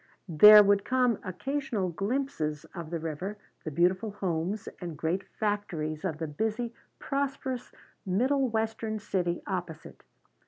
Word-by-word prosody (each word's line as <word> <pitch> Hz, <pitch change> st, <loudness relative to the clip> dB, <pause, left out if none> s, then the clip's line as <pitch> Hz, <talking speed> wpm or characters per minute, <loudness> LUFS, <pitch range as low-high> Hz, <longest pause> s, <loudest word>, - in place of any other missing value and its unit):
There 210 Hz, +6 st, +10 dB
would 200 Hz, 0 st, +3 dB
come 250 Hz, -3 st, +2 dB
occasional 215 Hz, +1 st, -2 dB
glimpses 195 Hz, -, -2 dB
of 170 Hz, -4 st, -7 dB
the 170 Hz, -, -2 dB
river, 165 Hz, +6 st, -4 dB, 0.3 s
the -, -, -3 dB
beautiful 185 Hz, +7 st, +1 dB
homes 190 Hz, 0 st, -2 dB
and 170 Hz, -4 st, -6 dB
great 170 Hz, +6 st, -1 dB, 0.2 s
factories 175 Hz, -7 st, -2 dB
of 165 Hz, -6 st, -2 dB
the 160 Hz, -, -3 dB
busy, 220 Hz, +9 st, -2 dB, 0.2 s
prosperous, 275 Hz, -2 st, -3 dB, 0.3 s
middle 255 Hz, +7 st, +1 dB
western 220 Hz, 0 st, -2 dB
city 180 Hz, -4 st, -2 dB
opposite. 180 Hz, -5 st, -5 dB
195 Hz, 125 wpm, -29 LUFS, 170-225 Hz, 0.3 s, There